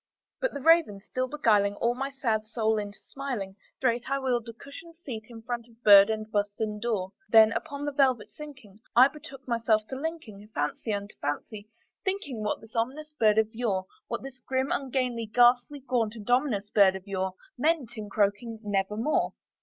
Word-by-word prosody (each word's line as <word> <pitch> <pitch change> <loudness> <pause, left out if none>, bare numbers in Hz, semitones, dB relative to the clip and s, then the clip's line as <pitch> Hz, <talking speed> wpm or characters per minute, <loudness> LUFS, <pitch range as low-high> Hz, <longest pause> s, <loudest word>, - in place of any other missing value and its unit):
'" - - -63
But - - -1
the 285 - -4
Raven 320 -9 +4
still 255 +5 -3
beguiling 210 -8 +2
all 235 +3 +1
my 270 +2 -3
fancy 230 -4 -2
into 215 -2 0
smiling, 245 -9 -4 0.2
Straight 245 -1 0
I 275 - +1
wheeled 245 -4 -1
a - - -7
cushioned 305 +7 -12
seat 245 -10 -7
in 225 -2 -11
front 240 0 -4
of 230 0 -24
bird 200 0 +9
and 220 0 -3
bust 205 0 -1
and 210 -1 -2
door; 210 -5 -1 0.2
Then, 220 -1 +7
upon 280 +5 -4
the 290 - -1
velvet 265 -6 +2
sinking, 260 -10 -12 0.2
I 255 +3 +8
betook 275 -4 -12
myself 230 -3 +2
to 265 - -4
linking 265 -9 -6
Fancy 150 +9 -2
unto 205 0 -4
fancy, 205 +8 -4 0.3
thinking 375 - -3
what 210 - -2
this 225 +1 -16
ominous 280 +7 -2
bird 215 -6 +3
of 220 +1 +2
yore 210 -5 -1 0.2
What - - -4
this 265 -2 -9
grim, 260 +1 -1
ungainly, 255 -4 -1
ghastly, 245 +5 +3
gaunt, 240 -4 -1
and 210 -3 -10
ominous 240 -6 +1
bird 195 -3 +5
of 190 0 -8
yore 190 -2 -2 0.2
Meant 280 -4 0
in 210 -2 -6
croaking 210 +3 0
"Nevermore." 210 +6 0
230 Hz, 185 wpm, -28 LUFS, 210-265 Hz, 0.3 s, bird